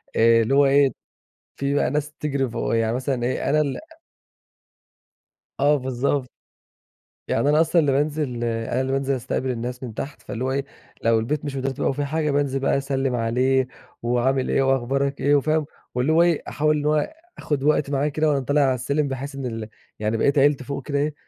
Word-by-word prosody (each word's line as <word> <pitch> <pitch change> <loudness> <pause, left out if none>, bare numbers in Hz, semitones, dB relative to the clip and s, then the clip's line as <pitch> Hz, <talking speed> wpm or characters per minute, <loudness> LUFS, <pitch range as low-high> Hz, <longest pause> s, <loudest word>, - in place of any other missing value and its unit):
اللي 115 +3 +4
هو 145 - +6
إيه، 135 -1 +4 0.6
في 140 0 -1
بقى 145 -3 +2
ناس 150 +1 -2
تجري 140 -4 -2
فوق 115 0 -1
يعني 115 0 +1
مثلًا 130 -1 -2
إيه 130 +2 -1
أنا 155 - +3
اللي 140 -3 -1
أ 325 0 -16 1.6
آه، 145 +1 +4
بالضبط. 130 0 -1 1.0
يعني 140 - +1
أنا 150 +2 +5
أصلًا 165 +1 +3
اللي 145 -3 +2
بانزل 145 -3 -1
أنا 115 +2 -1
اللي 130 0 -2
بانزل 135 0 0
أستقبل 130 +1 -2
الناس 125 +2 -5
من 115 -4 -6
تحت. 140 +6 -6
فاللي 120 - -5
هو 130 - 0
إيه، 140 0 -1 0.4
لو 115 -1 +4
البيت 145 +6 -2
مش 140 -1 -4
مترتب 135 0 -2
أو - - +2
فيه 145 - -2
حاجة، 150 +1 -1
بانزل 140 -1 0
بقى 135 - +1
أسلم 135 -2 -1
عليه 125 +3 +1 0.4
وعامل 125 +2 +1
إيه - - +2
وأخبارك 135 +1 0
إيه 145 +2 +4
وفاهم؟ 155 +2 +1 0.3
واللي 125 +5 +1
هو 165 - +5
إيه 170 -3 +3
أحاول 150 0 +1
اللي 150 0 -1
هو 155 - +1 0.2
آخد 145 -3 -2
وقت 150 -1 +2
معاه 140 +1 +1
كده 155 +1 +1
وأنا 140 - +2
طالع 145 +2 +1
على 130 -2 +3
السلم، 140 +4 -1
بحيث 135 +1 -5
إن 135 -1 -5
ال 115 -3 -5 0.3
يعني 110 +1 0
بقية 140 - +3
عيلتي 140 -1 +3
فوق 140 +1 -5
كده 145 -1 -1
إيه، 150 +1 0
135 Hz, 195 wpm, -23 LUFS, 125-145 Hz, 1.6 s, هو